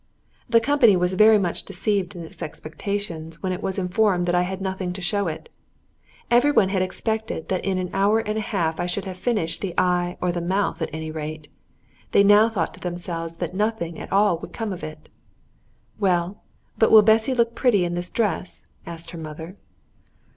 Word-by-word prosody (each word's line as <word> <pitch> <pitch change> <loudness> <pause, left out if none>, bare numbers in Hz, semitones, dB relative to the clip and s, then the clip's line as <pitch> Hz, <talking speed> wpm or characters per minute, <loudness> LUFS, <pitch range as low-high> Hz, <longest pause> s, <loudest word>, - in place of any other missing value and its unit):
The 230 0 +6
company 235 -4 +4
was 180 +1 +1
very 215 +3 +6
much 180 -4 -1
deceived 195 0 -2
in 170 - -7
its 160 - -13
expectations 165 +1 -5
when 185 - 0
it 185 +2 -4
was 190 - -2
informed 185 -1 +1
that 175 - 0
I 175 - +3
had 185 +1 -3
nothing 190 -2 -3
to 185 - -7
show 195 +2 0
it. 160 0 -5 0.8
Every 245 +5 +5
one 195 -9 +4
had 190 -1 0
expected 220 0 -2
that 185 - -1
in 195 -1 0
an 180 -1 -3
hour 200 +3 +3
and 215 -1 -2
a 220 - -1
half 170 -7 -1
I 175 - -1
should 190 +3 -3
have 190 -1 -5
finished 185 -5 -1
the 185 -4 -4
eye 180 -1 +1
or 180 - 0
the 175 0 -3
mouth 190 +2 -1
at 160 - -1
any 160 0 -5
rate; 155 -1 -6 0.6
they 200 - +6
now 205 +2 +6
thought 190 -8 -2
to - - -14
themselves 170 -2 -4
that 175 0 -4
nothing 200 -5 -2
at - - -8
all 200 -4 +3
would - - -10
come 220 -4 -3
of 180 - -9
it. 155 - -8 0.9
"Well, 185 -1 0 0.4
but 220 - +5
will 220 -1 +8
Bessy 220 +4 +3
look 235 -1 +2
pretty 220 -9 +2
in 175 - -2
this 175 +1 -3
dress?" 200 -6 -2 0.2
asked 170 0 -7
her 170 - -8
mother. 160 +2 -8
185 Hz, 200 wpm, -23 LUFS, 170-210 Hz, 0.9 s, will